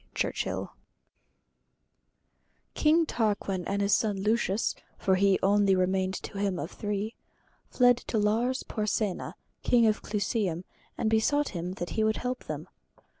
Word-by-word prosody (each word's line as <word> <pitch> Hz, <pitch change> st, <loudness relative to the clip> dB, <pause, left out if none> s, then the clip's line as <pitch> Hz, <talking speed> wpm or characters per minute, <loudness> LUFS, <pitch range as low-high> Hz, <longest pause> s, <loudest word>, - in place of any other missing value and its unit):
CHURCH -, -, -1 dB, 2.3 s
King 320 Hz, +2 st, +3 dB
Tarquin 205 Hz, -, -1 dB
and 200 Hz, 0 st, 0 dB
his 200 Hz, -, +2 dB
son 210 Hz, -3 st, +2 dB
Lucius 210 Hz, 0 st, +1 dB, 0.2 s
(for 190 Hz, -, +1 dB
he 195 Hz, 0 st, +4 dB
only 200 Hz, 0 st, +4 dB
remained 185 Hz, +1 st, +1 dB
to 200 Hz, -, -6 dB
him 200 Hz, -2 st, 0 dB
of 160 Hz, +2 st, -5 dB
the -, -, -14 dB
three) 210 Hz, +1 st, -2 dB, 0.6 s
fled 245 Hz, -1 st, +4 dB
to 235 Hz, -, -3 dB
Lars 230 Hz, +5 st, +1 dB
Porsenna, 210 Hz, -2 st, -2 dB, 0.3 s
King 235 Hz, -2 st, +4 dB
of 215 Hz, -1 st, +2 dB
Clusium, 200 Hz, -4 st, -1 dB, 0.3 s
and -, -, 0 dB
besought 225 Hz, +7 st, +2 dB
him 175 Hz, 0 st, -4 dB
that 175 Hz, -2 st, -5 dB
he 220 Hz, -, 0 dB
would 220 Hz, 0 st, +1 dB
help 250 Hz, +1 st, -4 dB
them. -, -, -5 dB
210 Hz, 140 wpm, -28 LUFS, 195-225 Hz, 2.3 s, he